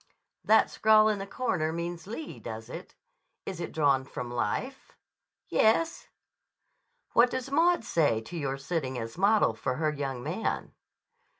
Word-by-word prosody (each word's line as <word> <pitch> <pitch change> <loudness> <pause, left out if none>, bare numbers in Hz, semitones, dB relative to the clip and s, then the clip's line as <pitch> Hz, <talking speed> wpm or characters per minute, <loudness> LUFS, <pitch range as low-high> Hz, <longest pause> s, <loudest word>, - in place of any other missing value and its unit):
"That 220 +1 +4
scrawl 215 0 +5
in 210 -2 0
the 195 - -5
corner 195 -9 -1
means 170 +1 -5
Lee, 265 +9 -7
does 110 -1 -7
it? - - -9 0.5
Is 185 -3 -5
it 170 - -4
drawn 140 -4 +2
from 125 -2 -6
life?" 120 - -3 0.5
"Yes." 275 +10 +2 1.1
"What 240 +2 +6
does 260 +2 -4
Maud 340 +1 +3
say 150 - +2
to 175 - -10
your 135 -4 -2
sitting 135 -3 -3
as 115 -1 -5
model 200 - +3
for 120 +3 -3
her 155 +2 0
young 135 -4 -4
man?" 180 +9 -3
170 Hz, 145 wpm, -29 LUFS, 135-220 Hz, 1.1 s, What